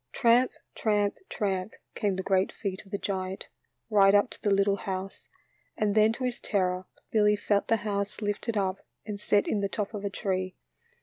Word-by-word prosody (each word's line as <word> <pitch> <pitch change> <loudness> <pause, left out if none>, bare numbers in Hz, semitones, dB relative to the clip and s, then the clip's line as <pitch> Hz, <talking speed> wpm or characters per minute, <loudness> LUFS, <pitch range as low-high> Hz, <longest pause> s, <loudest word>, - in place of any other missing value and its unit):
Tramp, 240 +1 +4 0.2
tramp, 205 -2 +1
tramp, 195 -1 -2 0.2
came 205 -4 0
the 190 - -3
great 190 0 +2
feet 195 -3 -4
of - - -17
the 200 - -2
giant, 190 -1 -4 0.4
right 200 -2 +5
up 205 +4 +4
to - - -9
the 210 - +1
little 200 0 +3
house, 190 0 -5 0.5
and 210 -1 +1
then 215 +1 +5
to 255 - -5
his 250 -1 -1
terror 185 -3 0 0.3
Billy 210 -1 +4
felt 205 0 +1
the 225 - +3
house 200 -1 -2
lifted 210 +1 -2
up 190 -1 0 0.3
and 205 -2 -5
set 205 0 +2
in 210 - +1
the 200 -1 0
top 210 +1 -3
of 205 -1 -5
a 200 - -1
tree. 185 -2 -2
200 Hz, 190 wpm, -28 LUFS, 195-210 Hz, 0.5 s, right